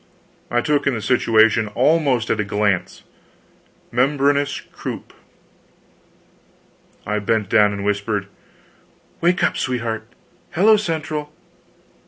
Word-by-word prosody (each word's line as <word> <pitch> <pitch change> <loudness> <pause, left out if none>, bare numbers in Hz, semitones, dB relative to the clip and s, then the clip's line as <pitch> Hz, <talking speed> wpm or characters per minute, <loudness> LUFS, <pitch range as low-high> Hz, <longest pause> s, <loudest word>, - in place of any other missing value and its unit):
I 120 - +1
took 145 +2 0
in 135 - +1
the 110 - -4
situation 110 -3 +3
almost 135 -3 +2
at 110 - 0
a - - +2
glance 105 -2 -1 0.9
membranous 140 +3 +1
croup! - - -8 1.9
I 105 +1 -1
bent 105 -1 -1
down 105 -1 +4
and 100 0 -5
whispered: 105 0 -1 1.0
"Wake 175 +2 +2
up, - - +2
sweetheart! 115 -3 -3 0.5
Hello 215 +5 +5
Central." 155 -6 -3
120 Hz, 105 wpm, -20 LUFS, 105-145 Hz, 1.9 s, Hello